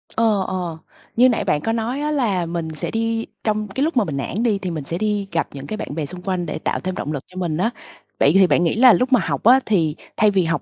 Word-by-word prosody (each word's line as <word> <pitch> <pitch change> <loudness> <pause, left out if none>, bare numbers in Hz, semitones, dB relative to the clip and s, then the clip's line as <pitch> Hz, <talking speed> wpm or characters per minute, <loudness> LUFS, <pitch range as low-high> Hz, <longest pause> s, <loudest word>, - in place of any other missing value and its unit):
Ờ, 215 -4 +2
ờ. 180 -3 -3 0.4
Như 250 +2 +6
nãy 240 - 0
bạn 150 - 0
có 225 - -1
nói 230 +5 -2
á, 300 0 -1
là 215 - 0
mình 170 -1 -3
sẽ 150 - -4
đi 225 0 -1 0.2
trong 215 -1 0
cái 260 +8 -2
lúc 320 -2 0
mà 235 - +5
mình 150 -7 -4
nản 190 +10 -2
đi 215 -5 +1
thì 185 -2 -4
mình 155 -3 -4
sẽ 165 +5 -4
đi 205 0 -1
gặp 165 -1 0
những 140 0 -8
cái 215 - -4
bạn 145 - -6
bè 160 -2 -2
xung 180 +4 -9
quanh 180 -1 -2
để 155 - -4
tạo - - -1
thêm 185 0 -4
động 150 - -4
lực 140 - -4
cho 185 - -14
mình 170 -4 -1
á. 220 +7 +1 0.5
Vậy 140 - +5
thì 190 0 +6
bạn 175 - +3
nghĩ 170 - +1
là 245 +1 +7
lúc 255 +1 +1
mà 250 - +6
học 140 -4 -2
á, 250 +4 +7
thì 165 -8 +1 0.2
thay 215 -1 +4
vì 190 -2 +2
học 165 +1 0
195 Hz, 290 wpm, -21 LUFS, 165-225 Hz, 0.5 s, là